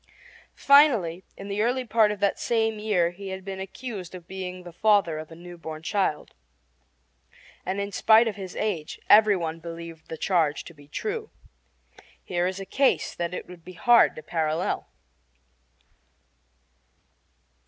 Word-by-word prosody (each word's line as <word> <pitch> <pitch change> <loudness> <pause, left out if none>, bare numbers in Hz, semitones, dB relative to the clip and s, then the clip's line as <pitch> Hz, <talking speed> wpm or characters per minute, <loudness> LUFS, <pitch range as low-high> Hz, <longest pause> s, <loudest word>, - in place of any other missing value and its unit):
Finally, 235 - +4
in 195 - -8
the 200 +1 -1
early 250 +3 0
part 220 -2 +3
of 210 - -5
that 200 -1 +1
same 225 -2 0
year 190 -6 +1
he 195 +3 -9
had 190 0 -6
been 195 -1 -5
accused 195 -2 -7
of 175 -2 -11
being 185 -1 -6
the 175 - -10
father 200 -5 +3
of 155 - -8
a 165 - -11
new 175 +1 -11
born 160 -1 -7
child, 165 -2 -1 1.3
and 190 +2 -1
in 200 0 -3
spite 220 +3 +5
of 215 - -2
his 190 -2 -8
age 185 -8 -3
every 210 -1 +7
one 165 -1 -4
believed 165 -1 -9
the 160 - -5
charge 160 -4 +1
to 170 - -12
be 145 -2 -18
true. 435 - -4 0.9
Here 175 0 -1
is 190 +1 -4
a 195 - -6
case 270 +8 +1
that 170 -1 -3
it - - -6
would 180 -2 -12
be 185 - -10
hard 235 +7 +5
to 155 - -9
parallel. 160 +1 -1
190 Hz, 160 wpm, -26 LUFS, 170-210 Hz, 1.3 s, every